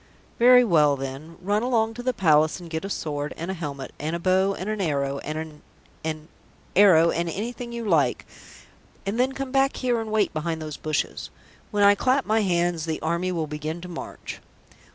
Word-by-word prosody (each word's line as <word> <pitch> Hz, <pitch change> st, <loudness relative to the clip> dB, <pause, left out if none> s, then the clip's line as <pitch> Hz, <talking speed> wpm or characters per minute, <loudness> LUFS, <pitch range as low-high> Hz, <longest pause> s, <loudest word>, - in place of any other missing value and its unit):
"Very 250 Hz, +1 st, +8 dB
well, 150 Hz, -9 st, +4 dB
then. 135 Hz, +5 st, -7 dB
Run 205 Hz, +3 st, +1 dB
along 225 Hz, -2 st, +1 dB
to 245 Hz, -, -7 dB
the 255 Hz, +1 st, +1 dB
Palace 155 Hz, -6 st, +3 dB
and 170 Hz, -2 st, -11 dB
get 160 Hz, +1 st, -3 dB
a 195 Hz, -, -4 dB
sword 150 Hz, -5 st, -3 dB
and 170 Hz, +3 st, -4 dB
a -, -, -2 dB
helmet 145 Hz, -6 st, -6 dB
and 155 Hz, +3 st, -2 dB
a -, -, -3 dB
bow 190 Hz, +2 st, +2 dB
and 185 Hz, -, -6 dB
an 215 Hz, -1 st, -2 dB
arrow 140 Hz, -5 st, -1 dB
and 155 Hz, +2 st, -5 dB
an 155 Hz, -1 st, -7 dB, 0.4 s
an 155 Hz, -1 st, -4 dB, 0.5 s
arrow 170 Hz, -5 st, +6 dB
and 170 Hz, 0 st, -1 dB
anything 235 Hz, +6 st, -5 dB
you 235 Hz, -1 st, -5 dB
like, 160 Hz, -7 st, +2 dB, 0.8 s
and 200 Hz, +4 st, -2 dB
then 260 Hz, +2 st, +2 dB
come 270 Hz, -1 st, -5 dB
back 270 Hz, 0 st, +2 dB
here 245 Hz, -3 st, 0 dB
and 220 Hz, -1 st, -6 dB
wait 215 Hz, -2 st, +1 dB
behind 160 Hz, +1 st, -2 dB
those 155 Hz, -2 st, -6 dB
bushes. 155 Hz, -1 st, -3 dB, 0.4 s
When 205 Hz, -2 st, +1 dB
I 200 Hz, 0 st, +8 dB
clap 255 Hz, +6 st, +1 dB
my 220 Hz, 0 st, +2 dB
hands 175 Hz, -4 st, 0 dB
the 160 Hz, -1 st, -2 dB
army 170 Hz, +3 st, 0 dB
will 165 Hz, -3 st, -1 dB
begin 155 Hz, +2 st, -5 dB
to 180 Hz, -, -8 dB
march." 175 Hz, -2 st, -8 dB
175 Hz, 200 wpm, -25 LUFS, 155-215 Hz, 0.8 s, Very